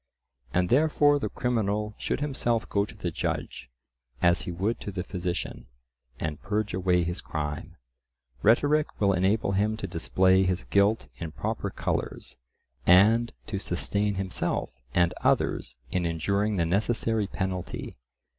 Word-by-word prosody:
And 90 +3 +1
therefore 145 +1 +4
the - - -2
criminal 105 -3 -1
should - - -2
himself 120 -5 0
go 100 0 +1
to 100 - -13
the - - -3
judge 65 - -3 0.5
as 85 0 +3
he - - -2
would 100 +7 -1
to 100 - -5
the 95 -2 -3
physician, 90 -2 -4 0.5
and 80 -2 -3
purge 105 0 -1
away 90 -1 +2
his 85 +2 -3
crime. 75 -2 -4 0.7
Rhetoric 145 +7 +3
will 100 -1 +3
enable 95 +3 +2
him 105 +3 +1
to 100 - -4
display 95 +2 +3
his 95 -1 0
guilt 100 +3 +2
in 80 -2 -5
proper - - -3
colours, 70 - -3 0.5
and 110 - +5
to 100 -3 -3
sustain 100 +3 -1
himself 95 -1 -1 0.2
and 85 0 +3
others - - +1
in 90 -2 0
enduring 100 +6 0
the 85 -3 +1
necessary 110 +3 +1
penalty. 95 -2 -4
100 Hz, 140 wpm, -27 LUFS, 90-110 Hz, 0.7 s, and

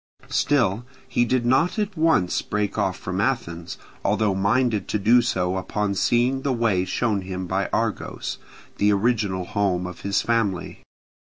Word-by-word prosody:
Still 120 -7 +2 0.2
he 120 - +1
did 125 0 0
not 135 - +2
at 210 -2 -1
once 160 - +2
break 105 -1 -2
off 95 -1 0
from 95 +1 -3
Athens, 85 -9 -2 0.3
although 105 -3 +2
minded 105 +3 +1
to - - 0
do 115 +4 +5
so 95 -5 0
upon 100 +2 -2
seeing 120 +6 +2
the 140 - 0
way 110 -7 +1
shown 105 -1 0
him 95 0 -5
by - - -1
Argos, - - -2 0.4
the 105 0 +3
original 100 -3 +1
home 95 -3 0
of 90 -1 -8
his 100 0 0
family. 110 -6 -1
105 Hz, 155 wpm, -23 LUFS, 95-120 Hz, 0.4 s, do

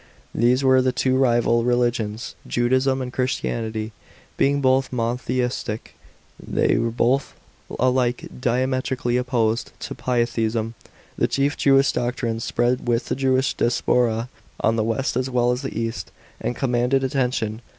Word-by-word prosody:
These 125 +3 +2
were 130 -1 +5
the 130 0 +2
two 130 +1 +1
rival 120 -2 +3
reli' 120 0 +3
iions, 110 -1 -5
Judaism 130 +2 +1
and 125 0 -7
Christianitv. 115 -4 -2 0.4
Being 140 +1 +2
both 130 -1 +2
mono 120 -1 -1
theistic, 125 -3 -3 0.5
th' - - 0
y - - +3
were 115 0 0
both 125 +4 0 0.4
alike 125 -1 +1 0.2
diametrically 130 +1 0
opposed 120 -3 0
to - - -5
p"lytheism. 115 -2 -1 0.5
The - - +3
chief 140 +1 0
Jewish 135 0 +4
doctrines 120 -2 -2
spread 120 +1 0
with 120 0 0
the - - 0
Jewish 130 0 +1
diaspora 120 -1 +1 0.4
fn 110 - +3
the 110 - +1
west 115 +4 -1
as 130 +1 0
well 125 -1 +2
as 125 +1 -2
the 135 -5 -4
east, 115 0 -3 0.3
and 120 - -2
commanded 125 +1 +1
attention. 125 -4 -1
125 Hz, 145 wpm, -23 LUFS, 115-130 Hz, 0.5 s, were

